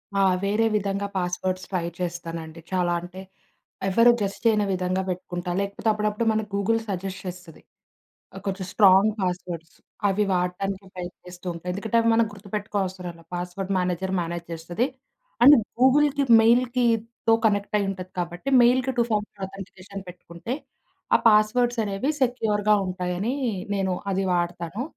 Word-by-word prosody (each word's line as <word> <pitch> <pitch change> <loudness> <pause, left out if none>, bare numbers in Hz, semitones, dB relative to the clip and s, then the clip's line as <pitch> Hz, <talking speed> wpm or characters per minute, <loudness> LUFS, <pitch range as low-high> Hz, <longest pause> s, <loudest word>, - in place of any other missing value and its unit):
ఆ! - - +2 0.2
వేరే 210 +3 +2
విధంగా 200 0 -1
పాస్‌వర్డ్స్‌ 185 +1 -2
ట్రై 175 -3 -1
చేస్తానండి. 165 -2 -5
చాలా 180 -2 +1
అంటే 180 +2 -9 0.7
ఎవ్వరు 230 +5 +6
గెస్ 200 -1 -2
చేయని 215 -2 +4
విధంగా 185 +1 -1
పెట్టుకుంటా. 175 0 -4
లేకపోతే 200 +3 -2
అప్పుడప్పుడు 210 +1 -1
మన 220 0 0
గూగుల్ 215 +3 +1
సజెస్ట్ 190 0 -4
చేస్తది. 180 -3 -9 0.8
కొంచెం 190 -1 -3
స్ట్రాంగ్ 195 +1 +6
పాస్‌వర్డ్స్‌. 180 -3 -4 0.3
అవి 200 +2 +2
వాడటానికి 185 +2 -2
ట్రై 180 -1 -5 0.2
చేస్తూ 180 0 -11
ఉంటా. 170 - -10
ఎందుకంటే 210 +4 -2
అవి 230 0 +3
మనం 230 0 +4
గుర్తుపెట్టుకో 205 +1 -4
అవసరం 180 -1 -6
లేదు. 165 - -18
పాస్‌వర్డ్ 180 +2 -4
మేనేజర్ 180 +1 -1
మేనేజ్ 170 0 -4
చేస్తది. 175 +8 -2 0.6
అండ్ 290 +2 +10 0.2
గూగుల్‌కి, 285 +2 +4 0.2
మెయిల్‌కితో 235 -1 +2
కనెక్టయి 205 -1 +1
ఉంటది 185 -1 -7
కాబట్టి 175 +6 -5
మెయిల్‌కి 255 +2 +3
టూ 235 - +4
ఫామర్ 210 -2 -2
ఆథెంటికేషన్ 195 0 -9
పెట్టుకుంటే, 175 +5 -7 0.6
ఆ - - -4
పాస్‌వర్డ్స్‌ 225 +3 +3
అనేవి 200 +7 -1
సెక్యూర్‌గా 215 -4 +2
ఉంటాయనీ 185 +5 -2 0.4
నేను 190 -1 0 0.2
అది 195 +1 0
వాడతాను. 175 +4 -2
195 Hz, 135 wpm, -25 LUFS, 180-215 Hz, 0.8 s, అండ్